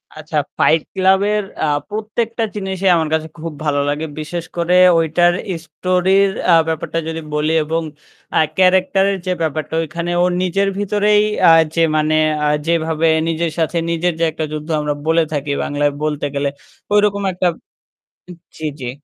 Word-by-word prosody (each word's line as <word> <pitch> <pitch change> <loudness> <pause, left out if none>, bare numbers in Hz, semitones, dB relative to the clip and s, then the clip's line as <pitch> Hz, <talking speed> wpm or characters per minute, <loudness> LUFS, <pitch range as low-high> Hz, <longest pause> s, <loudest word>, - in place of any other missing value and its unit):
আচ্ছা, 155 0 -5 0.2
ফাইট 160 - +3
ক্লাব-এর 195 +3 +2 0.2
আ - - +3 0.2
প্রত্যেকটা 220 +2 -3
জিনিসই 190 -1 -2
আমার 160 -2 0
কাছে 160 0 0
খুব 165 0 -6
ভালো 145 -1 +1
লাগে। 150 +2 -2
বিশেষ 165 +2 -5
করে 170 +1 +1 0.2
ঐটার 170 +2 +3 0.3
স্টোরির 185 +4 +2 0.2
আ - - +7
ব্যাপারটা 160 +1 -2
যদি 165 0 -4
বলি 150 +1 0
এবং 165 +2 -2 0.5
আ - - +5 0.2
ক্যারাক্টার 190 +1 +3
এর 195 - -2
যে 185 - -1
ব্যাপারটা। 155 0 -2
ঐখানে 170 +2 -4
ওর 180 - +2
নিজের 195 +2 0
ভিতরেই 205 +1 +2 0.2
আ - - +8 0.2
যে 165 - +2 0.2
মানে 155 0 +1 0.3
আ - - +2 0.2
যেভাবে 165 -1 +1 0.2
নিজের 165 0 -1
সাথে 165 +1 0
নিজের 170 +1 0
যে - - +1
একটা 160 0 -3
যুদ্ধ 155 +1 -6
আমরা 150 0 -1
বলে 165 +1 +3
থাকি 145 -1 -2
বাংলায় 145 0 0
বলতে 150 -1 -1
গেলে। 140 0 0 0.4
ঐরকম 205 -1 +2
একটা। 180 0 0 1.1
জ্বি, 155 - -3
জ্বি। 125 -2 -4
165 Hz, 160 wpm, -18 LUFS, 155-190 Hz, 1.1 s, আ